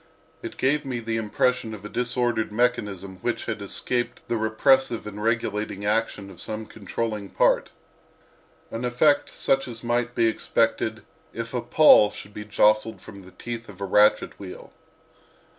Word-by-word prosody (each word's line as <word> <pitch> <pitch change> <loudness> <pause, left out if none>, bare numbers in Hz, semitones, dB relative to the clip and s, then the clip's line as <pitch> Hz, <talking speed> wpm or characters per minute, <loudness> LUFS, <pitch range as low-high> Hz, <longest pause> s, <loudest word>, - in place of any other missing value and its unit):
It - - -7
gave 145 +3 +1
me 130 -3 -3
the 115 0 -2
impression 115 +1 0
of 105 -1 -12
a - - -3
disordered 120 -2 -1
mechanism 105 -5 -1
which - - -3
had - - -4
escaped 120 -1 -3
the 120 - -1
repressive 115 +2 +2
and 105 0 -7
regulating 105 -3 -1
action 105 -2 -1
of 90 - -12
some 110 0 -5
controlling 105 0 -4
part—an 115 +2 -3
effect 135 +4 +3
such 135 0 0
as 115 -1 -6
might 120 0 0
be 115 - +3
expected 110 - 0 0.3
if 115 +1 -5
a 125 - -1
pawl 150 -9 +6
should 105 0 -11
be 105 0 -7
jostled 110 +1 +2
from 100 -2 -12
the 95 0 -14
teeth 120 +1 -7
of 95 - -12
a 100 - -3
ratchet 105 +2 +3
wheel. 95 -2 -10
115 Hz, 155 wpm, -25 LUFS, 105-120 Hz, 0.3 s, pawl